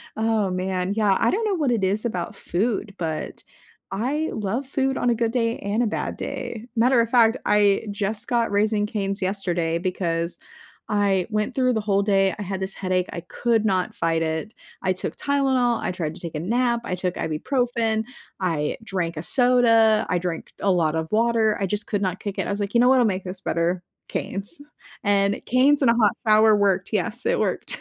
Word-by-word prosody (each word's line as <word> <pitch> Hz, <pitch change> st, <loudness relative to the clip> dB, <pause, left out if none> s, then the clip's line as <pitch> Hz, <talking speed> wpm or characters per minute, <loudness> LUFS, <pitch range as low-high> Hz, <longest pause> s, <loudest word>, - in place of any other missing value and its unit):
Oh, 220 Hz, -3 st, +1 dB
man, 185 Hz, +1 st, -1 dB
yeah, 205 Hz, -3 st, +3 dB
I -, -, +3 dB
don't 440 Hz, +3 st, 0 dB
know 400 Hz, -3 st, +1 dB
what 290 Hz, -7 st, +1 dB
it 220 Hz, -5 st, 0 dB
is 205 Hz, +5 st, 0 dB
about 180 Hz, -7 st, -3 dB
food, 205 Hz, +2 st, -2 dB
but 160 Hz, -2 st, -4 dB, 0.5 s
I 275 Hz, +10 st, -1 dB
love 220 Hz, +6 st, -2 dB
food 270 Hz, -1 st, 0 dB
on 245 Hz, -, +1 dB
a 235 Hz, -, +3 dB
good 230 Hz, 0 st, 0 dB
day 230 Hz, -2 st, 0 dB
and 205 Hz, +4 st, -1 dB
a 235 Hz, -, +2 dB
bad -, -, -3 dB
day, 230 Hz, +1 st, -5 dB
matter 240 Hz, +1 st, +4 dB
of 230 Hz, -, -1 dB
fact, 235 Hz, 0 st, +4 dB
I 205 Hz, 0 st, +3 dB
just 205 Hz, +1 st, -2 dB
got 235 Hz, -3 st, +1 dB
Raising 210 Hz, 0 st, +2 dB
Cane's 200 Hz, -2 st, -3 dB
yesterday 175 Hz, -4 st, -1 dB
because 170 Hz, -2 st, -2 dB, 0.5 s
I 200 Hz, -3 st, +2 dB
went 215 Hz, +4 st, -1 dB
through 255 Hz, -1 st, +2 dB
the 220 Hz, -, 0 dB
whole 200 Hz, -1 st, +1 dB
day. 195 Hz, -2 st, +2 dB
I -, -, -6 dB
had 190 Hz, 0 st, -4 dB
this 190 Hz, +1 st, -3 dB
headache, 185 Hz, -1 st, -1 dB
I 170 Hz, -, -5 dB
could 225 Hz, +1 st, 0 dB
not 185 Hz, -3 st, 0 dB
fight 165 Hz, 0 st, 0 dB
it, 160 Hz, +7 st, -2 dB, 0.3 s
I 185 Hz, 0 st, +2 dB
took 185 Hz, -, -5 dB
Tylenol, 265 Hz, -4 st, +1 dB
I -, -, -1 dB
tried 165 Hz, -4 st, -3 dB
to -, -, -10 dB
take 165 Hz, -2 st, -6 dB
a -, -, -2 dB
nap, 235 Hz, +5 st, +1 dB
I -, -, -3 dB
took 180 Hz, 0 st, -3 dB
Ibuprofen, 225 Hz, -, -1 dB, 0.4 s
I 160 Hz, -5 st, -1 dB
drank 175 Hz, -6 st, -3 dB
a 155 Hz, -, -4 dB
soda, 230 Hz, -3 st, +4 dB
I 180 Hz, -, +1 dB
drank 175 Hz, -2 st, -4 dB
a 200 Hz, -, +1 dB
lot 165 Hz, -3 st, +2 dB
of 160 Hz, 0 st, -2 dB
water, 225 Hz, -1 st, +2 dB
I 195 Hz, -, 0 dB
just 210 Hz, +3 st, -3 dB
could 205 Hz, -2 st, -1 dB
not 185 Hz, -1 st, -2 dB
kick 200 Hz, -2 st, -5 dB
it. -, -, -1 dB
I -, -, -2 dB
was 200 Hz, -, -2 dB
like, 200 Hz, +1 st, -3 dB
"You 235 Hz, -, +6 dB
know 250 Hz, -, +5 dB
what'll 255 Hz, -3 st, +5 dB
make 190 Hz, -2 st, -1 dB
this 185 Hz, 0 st, -7 dB
better, 175 Hz, 0 st, 0 dB, 0.3 s
Cane's?" 200 Hz, +11 st, -3 dB, 0.4 s
and 200 Hz, 0 st, +2 dB
Cane's 275 Hz, +4 st, +4 dB
and 260 Hz, -, +4 dB
a 230 Hz, -, +1 dB
hot 215 Hz, -3 st, +3 dB
shower 215 Hz, 0 st, +6 dB
worked. 195 Hz, -2 st, +1 dB
Yes, 210 Hz, -, -1 dB
it -, -, +1 dB
worked. -, -, -1 dB
205 Hz, 205 wpm, -23 LUFS, 185-235 Hz, 0.5 s, You